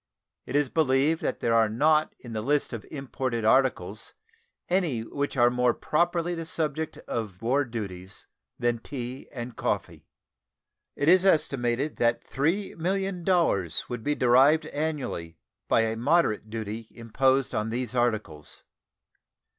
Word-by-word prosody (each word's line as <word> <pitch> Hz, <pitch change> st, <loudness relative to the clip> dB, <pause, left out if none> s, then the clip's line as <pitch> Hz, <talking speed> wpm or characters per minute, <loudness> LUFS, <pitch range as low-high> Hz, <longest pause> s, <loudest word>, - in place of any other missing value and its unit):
It 130 Hz, -, -4 dB
is 145 Hz, -1 st, +3 dB
believed 150 Hz, +3 st, +2 dB
that -, -, -2 dB
there 115 Hz, -, +1 dB
are 115 Hz, -1 st, +4 dB
not 155 Hz, +7 st, +2 dB
in 120 Hz, -2 st, -10 dB
the 110 Hz, -, -2 dB
list 145 Hz, +3 st, 0 dB
of 115 Hz, -, -6 dB
imported 130 Hz, -4 st, -3 dB
articles 110 Hz, -5 st, +1 dB, 0.5 s
any 175 Hz, -10 st, +1 dB
which 140 Hz, +4 st, -3 dB
are 120 Hz, 0 st, +5 dB
more 125 Hz, -1 st, +2 dB
properly 170 Hz, +2 st, 0 dB
the 165 Hz, -1 st, -4 dB
subject 160 Hz, -1 st, -2 dB
of 105 Hz, -6 st, -4 dB
war 135 Hz, +5 st, +2 dB
duties 95 Hz, -6 st, -7 dB, 0.3 s
than 120 Hz, -1 st, 0 dB
tea 125 Hz, 0 st, -7 dB
and 120 Hz, -3 st, -6 dB
coffee. -, -, -3 dB, 0.9 s
It 145 Hz, -, -1 dB
is 185 Hz, +2 st, +6 dB
estimated 140 Hz, -6 st, +1 dB
that 120 Hz, 0 st, +1 dB
$3,000,000 175 Hz, -, 0 dB
would 120 Hz, -2 st, -5 dB
be 145 Hz, 0 st, 0 dB
derived 135 Hz, +6 st, +5 dB
annually 145 Hz, -, -3 dB, 0.3 s
by -, -, +4 dB
a 110 Hz, 0 st, 0 dB
moderate 125 Hz, -5 st, +2 dB
duty 110 Hz, 0 st, -5 dB
imposed 130 Hz, +3 st, +1 dB
on 105 Hz, +1 st, -1 dB
these 120 Hz, +1 st, -3 dB
articles. 110 Hz, -, -2 dB
130 Hz, 135 wpm, -27 LUFS, 115-155 Hz, 0.9 s, is